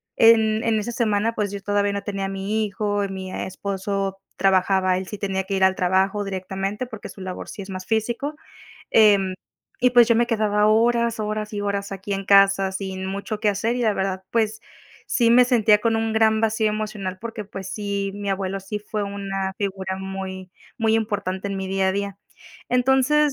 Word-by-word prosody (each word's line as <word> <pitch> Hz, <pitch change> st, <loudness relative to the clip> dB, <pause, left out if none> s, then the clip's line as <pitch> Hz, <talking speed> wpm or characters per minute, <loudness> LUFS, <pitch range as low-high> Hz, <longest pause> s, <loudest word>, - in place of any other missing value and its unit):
en 220 Hz, -1 st, +5 dB
en 225 Hz, -2 st, +2 dB
esa 230 Hz, +3 st, -4 dB
semana, 225 Hz, -1 st, +1 dB
pues 205 Hz, -2 st, -1 dB
yo 200 Hz, -, -5 dB
todavía 205 Hz, 0 st, +1 dB
no 200 Hz, 0 st, -3 dB
tenía 195 Hz, -1 st, -3 dB
a -, -, -3 dB
mi 200 Hz, +3 st, -1 dB
hijo. 205 Hz, 0 st, -1 dB
Mi 190 Hz, -1 st, -6 dB
esposo 195 Hz, 0 st, -3 dB, 0.2 s
trabajaba, 190 Hz, -1 st, +3 dB
él 185 Hz, 0 st, -5 dB
sí 210 Hz, -, -6 dB
tenía 190 Hz, -1 st, -2 dB
que 195 Hz, +1 st, -3 dB
ir 190 Hz, -, +1 dB
al 190 Hz, -, +3 dB
trabajo 190 Hz, +3 st, +1 dB
directamente 195 Hz, +3 st, -3 dB
porque 220 Hz, -3 st, -9 dB
su -, -, -12 dB
labor 185 Hz, -1 st, -6 dB
sí 210 Hz, -, -7 dB
es 195 Hz, -, -9 dB
más 185 Hz, -1 st, -6 dB
físico, 240 Hz, +7 st, -1 dB, 0.6 s
em, 200 Hz, -4 st, +5 dB, 0.5 s
y 250 Hz, 0 st, +4 dB
pues 240 Hz, -2 st, +6 dB
yo 230 Hz, -, +4 dB
me 235 Hz, +1 st, +3 dB
quedaba 210 Hz, -2 st, +2 dB
horas, 235 Hz, +1 st, +2 dB
horas 215 Hz, 0 st, -3 dB
y 205 Hz, -, -3 dB
horas 200 Hz, -1 st, -2 dB
aquí 195 Hz, +1 st, -5 dB
en 195 Hz, 0 st, -4 dB
casa 195 Hz, -1 st, +5 dB
sin 190 Hz, -1 st, -4 dB
mucho 200 Hz, +2 st, -4 dB
que 210 Hz, -, +2 dB
hacer 220 Hz, +4 st, 0 dB
y 245 Hz, -, -1 dB
la 215 Hz, -2 st, +2 dB
verdad, 190 Hz, -1 st, -2 dB
pues 220 Hz, -2 st, 0 dB, 0.5 s
sí 235 Hz, -3 st, +2 dB
me 250 Hz, +1 st, +7 dB
sentía 225 Hz, -4 st, +4 dB
con 225 Hz, 0 st, +1 dB
un 225 Hz, 0 st, -1 dB
gran 220 Hz, 0 st, +3 dB
vacío 220 Hz, -1 st, +2 dB
emocional 210 Hz, -3 st, -4 dB
porque, 225 Hz, -2 st, -6 dB
pues 195 Hz, -1 st, -8 dB
sí, 200 Hz, -2 st, -2 dB
mi 205 Hz, 0 st, -5 dB
abuelo 195 Hz, 0 st, -2 dB
sí 200 Hz, +2 st, -5 dB
fue 210 Hz, 0 st, -4 dB
una 195 Hz, -1 st, -3 dB
figura 190 Hz, -2 st, -3 dB
muy 190 Hz, -1 st, -6 dB, 0.3 s
muy 225 Hz, -1 st, +2 dB
importante 200 Hz, -3 st, -2 dB
en 195 Hz, -, -3 dB
mi 190 Hz, -, -3 dB
día 190 Hz, 0 st, +1 dB
a -, -, +1 dB
día. 200 Hz, 0 st, -3 dB, 0.5 s
Entonces, 265 Hz, +4 st, +3 dB
200 Hz, 200 wpm, -23 LUFS, 195-220 Hz, 0.6 s, me